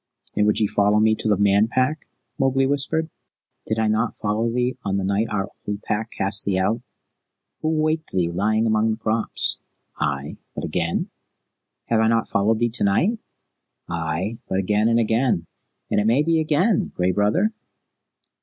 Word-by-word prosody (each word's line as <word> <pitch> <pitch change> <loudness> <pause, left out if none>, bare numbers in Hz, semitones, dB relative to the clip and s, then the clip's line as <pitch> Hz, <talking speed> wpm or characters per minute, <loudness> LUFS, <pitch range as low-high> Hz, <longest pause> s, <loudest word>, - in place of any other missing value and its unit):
"And 105 - +3
would 105 - +2
ye 110 - +3
follow 105 0 +2
me 110 0 +4
to 110 - -3
the 105 - +3
Man 100 +1 +4
Pack?" 130 +6 0 0.3
Mowgli 135 0 +2
whispered. 145 +4 -1 0.6
"Did 110 - -1
I 110 -1 +1
not 110 +2 0
follow 110 +2 -1
thee 125 +1 0
on 100 -1 -1
the 100 - -1
night 100 +4 0
our 95 -2 -1 0.2
old 105 0 -4
Pack 110 +2 -2
cast 100 +1 +2
thee 95 -2 0
out? 105 +5 0 0.8
Who 155 - 0
waked 155 0 0
thee 85 -2 0
lying 110 +5 +1
among 110 0 +2
the 110 - -1
crops?" 110 0 0 0.4
"Ay, 70 -1 -2 0.2
but - - -4
again?" 85 +1 -2 0.7
"Have 115 - +1
I 110 - +3
not 115 0 +2
followed 105 +3 +2
thee 120 +1 +1
to 120 - +1
night?" 180 - +2 0.7
"Ay, 85 +7 -3
but 95 - 0
again 105 +3 +2
and 115 0 +3
again, 115 -5 +1 0.5
and - - +3
it 105 - +1
may 125 +6 +3
be 165 +1 +2
again, 160 +7 +1
Gray 90 +1 +1
Brother?" 105 - +2
110 Hz, 175 wpm, -23 LUFS, 100-125 Hz, 0.8 s, me